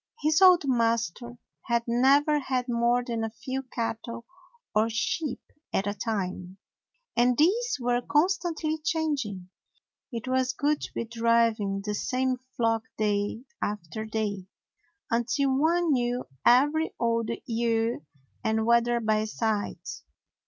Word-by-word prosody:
His 310 +2 +3
old 365 -3 +7
master 235 -2 0 0.3
had 235 -1 +1
never 275 +5 +4
had 255 -3 -1
more 240 +1 +2
than 230 -2 -3
a 225 - -1
few 260 +4 -5
cattle 235 -2 -5 0.5
or 215 +2 +3
sheep 245 +5 -2 0.3
at 195 - 0
a 205 - -1
time, 190 -4 -4 0.6
and 245 0 +3
these 445 +8 +2
were 245 0 +1
constantly 320 +1 0
changing. 290 - -2 0.6
It 235 +1 -5
was 255 0 +1
good 295 +3 0
to - - -7
be - - -2
driving 230 -3 +1
the 210 - -1
same 255 +3 0 0.2
flock 225 -1 +2 0.2
day 210 +2 0 0.2
after 210 +1 -3
day, 210 -3 -3 0.6
until 265 +4 +1
one 330 +4 +2
knew 245 -1 0 0.2
every 295 +6 +4
old 230 -1 0 0.2
ewe 230 - 0 0.4
and 220 -1 +1
wether 235 +1 +3
by 215 -1 +1
sight. 215 -5 -2
235 Hz, 125 wpm, -27 LUFS, 220-265 Hz, 0.6 s, old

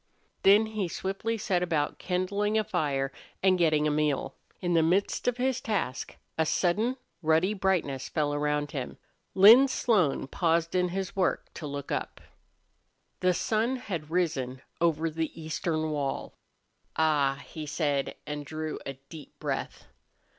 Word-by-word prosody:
Then 205 +3 +6
he 215 -4 -2
swiftly 195 +6 -3
set 190 -4 0
about 160 -4 -1
kindling 200 +4 0
a 215 - +3
fire 135 -7 -1 0.3
and 190 -1 +5
getting 155 -3 +3
a - - +1
meal. 150 -2 0 0.3
In 175 -1 -1
the 165 - +5
midst 180 +9 +1
of 245 -1 +2
his 255 0 0
task 195 - -2 0.2
a 160 - +4
sudden 215 +11 +1 0.2
ruddy 160 +5 +3
brightness 180 -9 0
fell 150 -2 0
around 150 0 0
him. 130 -4 -5 0.4
Lin 225 +8 +9
Slone 205 - +1
paused 165 +3 0
in 180 -1 +2
his 190 +1 -4
work 190 -2 0
to 155 - -6
look 140 0 -6
up. - - -3 1.0
The 180 -1 +2
sun 225 +7 +1
had 175 - -5
risen 145 -7 -1 0.2
over 165 -1 +2
the 160 +1 -3
eastern 155 0 -2
wall. 145 -2 -3 0.6
"Ah!" 145 -3 +2
he 155 -2 -7
said, 145 -2 -1
and 150 0 -4
drew 155 +2 -5
a 135 - -3
deep 140 +3 -13
breath. - - -4
165 Hz, 145 wpm, -28 LUFS, 150-195 Hz, 1.0 s, Lin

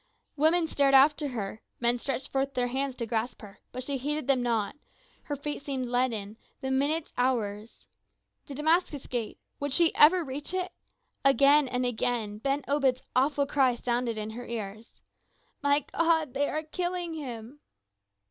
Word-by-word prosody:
Women 320 +3 +3
stared 280 -3 +3
after 290 +2 +5
her, 220 -4 -5 0.2
men 240 0 +2
stretched 270 +1 -3
forth 270 0 -1
their 250 -1 +1
hands 265 +1 -2
to 235 - -3
grasp 225 +1 -3
her, 200 -1 -12
but 255 - -5
she 275 +1 -2
heeded 295 +2 -2
them 270 -2 +2
not; 230 -3 0 0.5
her 290 - -3
feet 290 +1 -5
seemed 260 -3 -3
leaden, 225 -4 -1 0.2
the 265 - -3
minutes 290 +4 0
hours. 225 -4 -1 0.6
The 280 - -7
Damascus 310 -1 +1
Gate 235 -4 -3 0.2
would 285 0 -2
she 335 +2 +5
ever 340 +4 +6
reach 290 +5 -5
it? 370 0 -2 0.5
Again 280 +1 +5
and 250 0 -1
again 225 -3 -1
Ben 275 +4 -1
Obed's 270 -3 +1
awful 280 +2 +2
cry 270 -3 +2
sounded 240 -1 -1
in 215 0 -4
her 240 +2 -8
ears: 220 -1 -7 0.6
"My 285 0 +3
God! 325 -5 +2
they 285 +1 0
are 310 +1 -2
killing 350 +1 -3
him!" 255 -3 -7
270 Hz, 160 wpm, -28 LUFS, 240-295 Hz, 0.6 s, ever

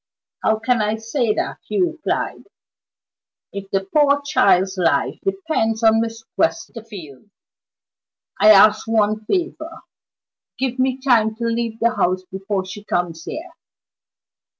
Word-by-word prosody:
"How 220 - +2
can 225 +1 0
I 210 +1 0
say 225 +1 -1
that," - - -3
he - - -2
replied, 335 -3 -2 1.1
"if 195 -1 -7
the 195 0 0
poor 285 +8 +2
child's 190 -9 +3
life 175 -3 0
depends 315 - -1
on 225 0 +5
Miss 225 0 -5
Westerfield? 205 - -4 1.1
I 215 - +6
ask 215 +1 +6
one 215 -1 +1
favor 335 - -3 0.8
give 260 -1 -2
me 260 0 +1
time 230 -5 +2
to 235 - -6
leave 230 -1 -2
the 235 0 +1
house 185 +1 +1
before 195 0 -3
she 205 +2 -9
comes 170 -4 -3
here." 345 +3 -7
220 Hz, 125 wpm, -20 LUFS, 200-255 Hz, 1.1 s, I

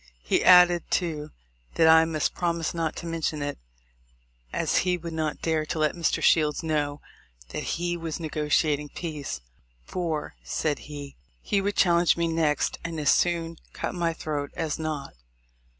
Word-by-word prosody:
He - - +1
added, 180 -1 +6
too, 155 -4 -1 0.5
that 165 - +5
I 160 0 +7
must 155 -2 -1
promise 170 -2 -1
not 165 -2 -2
to - - -7
mention 160 -3 -2
it, 145 - -4 0.9
as - - 0
he 180 0 +2
would 170 -1 -7
not 155 -2 -2
dare 160 -1 +1
to - - -3
let 155 -1 +2
Mr. 170 -2 0
Shields 155 -1 +3
know 150 -2 -1 0.5
that - - -3
he 175 +1 -1
was 165 -1 -4
negotiating 150 -1 0
peace; 150 - -5 0.4
for, 165 - -3
said 150 -2 -1
he, 145 -2 -8 0.3
"He 200 - +1
would 205 +1 -1
challenge 170 -2 +4
me 170 0 +1
next, 160 -2 0
and 165 -1 -4
as 150 - +4
soon 165 -1 +1 0.2
cut - - -3
my 170 -2 0
throat 150 -3 -4
as 160 -3 -2
not." 155 -3 -4
160 Hz, 160 wpm, -26 LUFS, 150-170 Hz, 0.9 s, I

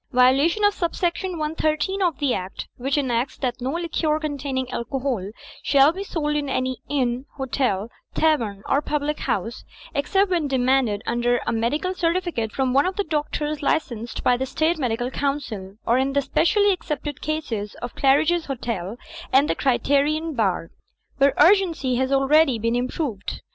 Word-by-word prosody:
(2) 265 - -14
Violation 275 +11 +4
of 410 0 +5
sub 340 -4 -2
section 355 +1 -1
113^ 310 +4 -1
of 345 -7 +1
the 280 -3 +1
Act, 185 +1 -5
which 270 +3 -1
enacts 255 -2 0
that 250 -1 -3
no 260 +3 -2
liquor 325 -2 0
containing 280 -4 -3
alcohol 245 -5 -2 0.3
shall 280 +1 +5
be 380 +4 -5
sold 300 -6 -2
in 290 -2 -1
any 255 -1 -1
inn, 255 -2 -1
hotel, 245 -6 -1 0.3
tavern 230 -11 +1
or 280 - +2
public 300 0 -2
house, 225 +5 -2 0.3
except 375 +7 +1
when 335 -5 +1
de 270 - -1
manded 245 -5 +2
under 240 +1 +1
a - - 0
medical 250 +11 0
certificate 335 -10 -1
from 260 -2 0
one 280 +5 +4
of 375 - -2
the 405 - 0
doctors 300 -2 -2
licensed 240 -6 -2
by 250 - +4
the 260 +2 -2
State 315 +4 0
Medical 245 -1 -1
Council, 260 -10 -3
or 240 +2 +3
in 270 +1 0
the 280 0 +2
specially 405 +9 +3
excepted 300 -4 -5
cases 255 -10 -3
of 245 - -5
Claridge's 310 +5 +2
Hotel 230 -6 -4 0.3
and 275 +3 +5
the - - +1
Criterion 285 +4 +1
Bar, 195 -9 0 0.5
where 275 0 +4
urgency 330 -8 +4
has 260 +1 0
already 275 0 +4
been 235 +3 0
proved. 245 - -4
275 Hz, 165 wpm, -23 LUFS, 245-310 Hz, 0.5 s, of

